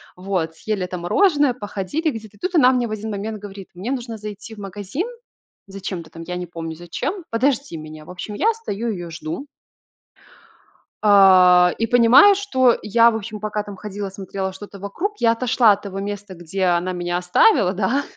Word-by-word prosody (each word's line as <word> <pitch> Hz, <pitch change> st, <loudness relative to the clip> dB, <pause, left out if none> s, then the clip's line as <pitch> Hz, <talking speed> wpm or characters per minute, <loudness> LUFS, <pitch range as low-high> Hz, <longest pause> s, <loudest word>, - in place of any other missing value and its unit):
Вот, 180 Hz, -3 st, -3 dB
съели 205 Hz, 0 st, -3 dB
это 180 Hz, 0 st, -5 dB
мороженое, 290 Hz, -, +3 dB
походили 225 Hz, -, -3 dB
где-то. 220 Hz, -4 st, -10 dB
И -, -, -28 dB
тут 365 Hz, 0 st, -3 dB
она 255 Hz, -6 st, +6 dB
мне 250 Hz, -2 st, 0 dB
в -, -, -8 dB
один 215 Hz, +1 st, -4 dB
момент 210 Hz, +1 st, -4 dB
говорит: 195 Hz, -2 st, -10 dB
"Мне 190 Hz, +8 st, -5 dB
нужно 240 Hz, -4 st, -4 dB
зайти 210 Hz, +1 st, -8 dB
в -, -, -13 dB
магазин". 205 Hz, -, -4 dB, 0.6 s
Зачем-то 190 Hz, -4 st, -6 dB
там, 165 Hz, 0 st, -10 dB
я 180 Hz, -, -4 dB
не 180 Hz, 0 st, -4 dB
помню 165 Hz, -1 st, -6 dB
зачем. 255 Hz, -, -5 dB
"Подожди 255 Hz, -, 0 dB
меня". 155 Hz, 0 st, -10 dB
В -, -, -11 dB
общем, 185 Hz, +3 st, -7 dB
я 440 Hz, -, +2 dB
стою 235 Hz, -, -4 dB
её 175 Hz, -5 st, -5 dB
жду 165 Hz, -, -6 dB, 1.6 s
а, 185 Hz, -3 st, +6 dB
и 225 Hz, -, 0 dB
понимаю, 245 Hz, -, +7 dB
что 260 Hz, -12 st, +2 dB
я, 230 Hz, +3 st, +4 dB
в -, -, -3 dB
общем, 215 Hz, 0 st, -6 dB
пока 210 Hz, 0 st, -3 dB
там 205 Hz, -1 st, -9 dB
ходила 200 Hz, +1 st, -6 dB
смотрела 190 Hz, 0 st, -5 dB
что-то 200 Hz, +1 st, -11 dB
вокруг, 330 Hz, -, -4 dB
я 230 Hz, -, +4 dB
отошла 235 Hz, -1 st, +3 dB
от 205 Hz, 0 st, 0 dB
того 195 Hz, -1 st, -6 dB
места, 205 Hz, -1 st, -5 dB
где 175 Hz, +3 st, -3 dB
она 180 Hz, +1 st, +1 dB
меня 175 Hz, 0 st, -2 dB
оставила, 180 Hz, -, +3 dB
да. 225 Hz, +9 st, 0 dB
205 Hz, 185 wpm, -21 LUFS, 185-235 Hz, 1.6 s, понимаю